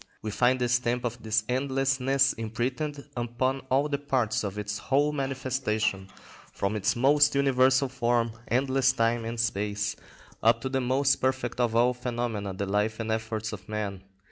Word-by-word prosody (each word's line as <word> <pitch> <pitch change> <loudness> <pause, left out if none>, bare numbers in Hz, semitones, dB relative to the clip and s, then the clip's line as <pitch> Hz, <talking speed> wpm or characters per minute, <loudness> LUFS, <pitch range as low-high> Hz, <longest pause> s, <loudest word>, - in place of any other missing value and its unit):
We 110 - -3
find 125 +4 +2
the 125 - +1
stamp 125 0 0
of 120 0 -4
this 110 0 +1
endlessness 135 +1 +1
imprinted 125 +6 -3
upon 120 +3 -1
all 135 +3 +2
the 140 -2 -2
parts 130 -7 0
of 100 0 -4
its 105 0 -3
whole 145 +2 +2
manifestation, 130 -8 -1 0.4
from 100 +2 -2
its 105 +1 +1
most 145 +4 +4
universal 135 0 +3
form, 120 -2 0 0.2
endless 135 +1 +2
time 115 -1 +1
and 115 +1 -4
space, 105 -2 -1 0.5
up - - +4
to 130 - -3
the 135 0 0
most 135 +2 +2
perfect 130 -2 -1
of 120 -2 +1
all 120 +2 +4
phenomena, 120 -5 -3
the 95 +1 -3
life 105 +3 0
and 110 0 -2
efforts 110 0 -3
of 95 -2 -9
man. 105 -3 -3
120 Hz, 165 wpm, -27 LUFS, 110-135 Hz, 0.5 s, most